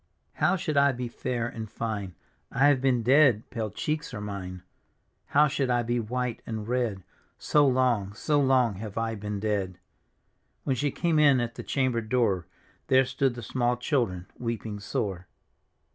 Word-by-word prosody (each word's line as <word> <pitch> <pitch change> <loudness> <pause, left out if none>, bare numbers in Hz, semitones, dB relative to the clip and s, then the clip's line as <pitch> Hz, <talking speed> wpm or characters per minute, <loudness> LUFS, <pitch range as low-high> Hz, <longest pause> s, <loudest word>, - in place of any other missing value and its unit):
" - - -45
How - - +4
should 155 -5 -2
I 140 -1 +5
be 125 0 -4
fair 120 0 -3
and 110 -3 -6
£ne? 100 -5 -4 0.4
I 135 +4 +3
have 135 -3 +3
been 130 -3 +2
dead; 130 -2 +4
pale 110 -3 -3
cheeks 150 +4 -3
are - - -5
mine. 95 -3 -6 0.3
" - - -46
How 150 +1 +7
should 140 -2 -1
I 120 -1 +2
be 120 +1 0
white 120 +1 -3
and 110 -2 -4
red. 120 -6 -1 0.3
So 145 -1 +3
long, 125 -7 +1
so 145 +7 +1
long 130 -6 +3
have 105 0 -7
I 115 0 -1
been 105 -1 -4
dead? 100 -3 -1 0.4
" - - -46
When 135 - 0
she 145 +4 0
came 165 +2 +1
in 140 -4 +6
at 120 -1 -2
the - - -7
chamber 130 -4 0
door. 110 -6 0 0.4
There 130 0 +5
stood 130 0 0
the 120 - -7
small 120 +1 0
children 115 - -1
weeping 115 -3 -4
sore. 95 -3 -3
120 Hz, 180 wpm, -27 LUFS, 105-130 Hz, 0.4 s, How